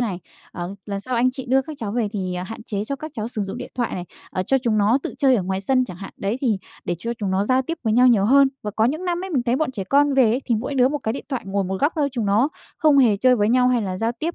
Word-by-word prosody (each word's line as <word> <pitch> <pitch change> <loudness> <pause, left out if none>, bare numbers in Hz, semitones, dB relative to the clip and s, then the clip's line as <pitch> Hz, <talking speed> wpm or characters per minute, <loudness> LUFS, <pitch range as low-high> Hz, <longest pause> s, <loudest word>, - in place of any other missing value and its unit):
này, 205 -7 -1 0.3
à, 175 - -6 0.2
lần 200 -1 -3
sau 255 +5 -4
anh 245 +2 +3
chị 260 0 -7
đưa 265 +1 +3
các 305 +2 -8
cháu 210 -3 -3
về 230 -2 0
thì, 185 -3 -3
à, 180 - -3
hạn 225 +3 -8
chế 205 -2 -3
cho 275 +4 -3
các 310 +2 -7
cháu 220 0 -3
sử 220 -3 -3
dụng 195 - -6
điện 250 - -7
thoại 240 -2 -2
này, 180 - -4 0.3
à, 185 - -1
cho 270 +8 +2
chúng 230 -4 0
nó 215 +6 +3
tự - - -5
chơi 265 -4 +4
ở 195 - 0
ngoài 190 +1 -2
sân 255 +5 +2
chẳng 180 -7 -9
hạn. 195 +1 -9
Đấy, 205 +5 -2
thì 230 -7 +1 0.3
để 175 - -2
cho 235 +4 -3
chúng 200 -3 -2
nó 190 +1 +1
giao 255 +4 +2
tiếp 330 +5 -5
với 220 - +2
nhau 250 +3 +5
nhiều 220 -6 +4
hơn." 275 +4 +6
Và 210 - -3
có 220 - +3
những 310 +9 0
năm 355 +1 -1
ấy 385 - -6
mình 270 -7 +1
thấy 240 +1 +1
bọn 310 -1 0
trẻ 195 -5 -4
con 285 +5 +3
về 265 -2 +5
ấy, 235 +5 +1
thì 240 - +1
mỗi 255 +6 -4
đứa 255 -1 +4
một 295 +1 -2
cái 220 -4 -2
điện 275 - -6
thoại, 260 -4 -3
ngồi 195 0 -1
một 190 +1 -3
góc 295 +3 +2
thôi, 290 -2 +1
chúng 235 -5 -2
nó 215 +8 +3 0.3
không 300 -3 +4
hề 230 -6 +5
chơi 250 +4 +4
với 205 0 +2
nhau 250 +1 +4
hay 245 -2 +2
là 185 -2 -3
giao 230 +1 0
tiếp, 335 +5 -2
240 Hz, 330 wpm, -22 LUFS, 205-265 Hz, 0.3 s, hơn